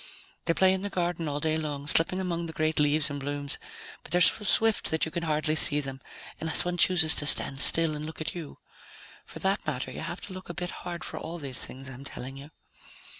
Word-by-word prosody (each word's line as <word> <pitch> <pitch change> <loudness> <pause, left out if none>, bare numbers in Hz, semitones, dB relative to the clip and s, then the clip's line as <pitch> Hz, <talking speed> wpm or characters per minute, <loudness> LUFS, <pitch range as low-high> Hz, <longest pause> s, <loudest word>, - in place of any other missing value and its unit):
They 165 - 0
play 190 0 +3
in 190 - -3
the 205 - -4
garden, 175 -3 -3
all 145 0 -3
day 155 +1 -1
long, 145 -3 -5
slipping 165 +5 +2
among 170 -2 -3
the 160 - -8
great 155 0 -1
leaves 150 0 +3
and 145 - -5
blooms, 145 0 -4 0.4
but - - -13
they're 175 - +2
so 210 - +4
swift 220 +3 +1
that 160 - 0
you 160 - -7
can 170 +1 -4
hardly 155 -1 -1
see 150 -1 +4
them, 135 -2 -7 0.4
unless 160 +1 0
one 175 0 -3
chooses 175 -3 +4
to 145 - +4
stand 140 -1 +7
still 165 -2 +7
and 150 +1 -6
look 160 - -10
at 155 - -4
you. 165 -5 -9 0.7
For - - -12
that 195 +2 -1
matter, 130 -4 -4
you - - -8
have 175 - -6
to 205 - -9
look 185 -1 -11
a 175 - -7
bit 180 -2 -4
hard 175 -2 -8
for - - -7
all 165 +2 -7
these 135 -5 -6
things 135 +1 -9
I'm 130 0 -10
telling 135 0 -9
you." 140 +2 -12
160 Hz, 235 wpm, -27 LUFS, 145-175 Hz, 0.7 s, stand